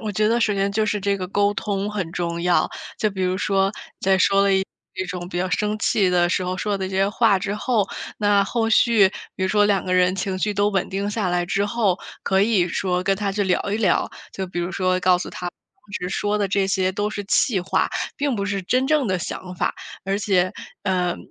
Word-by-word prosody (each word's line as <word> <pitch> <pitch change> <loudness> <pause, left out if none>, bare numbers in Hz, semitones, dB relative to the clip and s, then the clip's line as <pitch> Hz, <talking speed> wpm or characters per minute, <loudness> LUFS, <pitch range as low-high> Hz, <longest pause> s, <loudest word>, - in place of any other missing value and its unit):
我 215 -2 -4
觉 215 +2 +2
得 235 +1 +2
首 210 -2 +2
先 195 0 0
就 215 +1 0
是 210 0 -1
这 200 0 +1
个 185 -1 -4
沟 205 +2 +1
通 205 0 -2
很 185 -6 -4
重 170 -1 -2
要。 180 0 +2 0.3
就 215 - 0
比 190 -1 -6
如 185 0 +1
说， 195 0 +1 0.3
在 190 0 +3
说 195 +1 +4
了 200 -1 +3
一 190 0 +2 0.4
种 180 -2 -5
比 175 - -6
较 185 +1 -1
生 210 +2 0
气 195 -4 +2
的 175 -1 +3
时 180 +1 0
候 185 0 -2
说 205 +2 -2
了 - - -8
那 190 -1 -3
些 195 +1 +1
话 210 -2 +3
之 200 +1 -2
后， 220 -2 +1 0.3
那 205 -1 +3
后 225 +2 -1
续 220 -4 +5 0.3
比 190 - -5
如 190 - +1
说 210 +1 +4
两 195 -3 +1
个 185 - -2
人 180 0 +3
情 190 0 -2
绪 210 +1 -1
都 205 +1 +2
稳 195 -3 -1
定 200 +1 -2
下 205 -4 -1
来 175 0 +1
之 200 +3 0
后， 205 -4 +1 0.2
可 190 0 +2
以 200 -4 +3
说 180 +1 -1
跟 195 0 +1
他 200 -2 -2
去 205 0 0
聊 190 -2 +1
一 - - +1
聊， 195 -6 +2 0.2
就 190 -1 -4
比 175 -1 -4
如 175 +2 -2
说 185 -1 +1
告 180 -1 +4
诉 - - -5
他 180 - -5
当 235 +4 -19
时 180 - -3
说 205 +2 -1
的 200 - +1
这 195 +1 +1
些 190 -1 +1
都 205 +2 -1
是 205 -2 -5
气 200 0 +2
话， 180 - 0 0.3
并 280 -4 0
不 200 0 -2
是 200 -1 -2
真 255 +8 +1
正 295 -6 +2
的 185 -1 +1
想 180 +1 -6
法。 - - 0 0.3
而 195 +1 0
且， 185 -3 +1 0.3
呃， 180 -2 0
195 Hz, 260 characters per minute, -22 LUFS, 185-210 Hz, 0.4 s, 续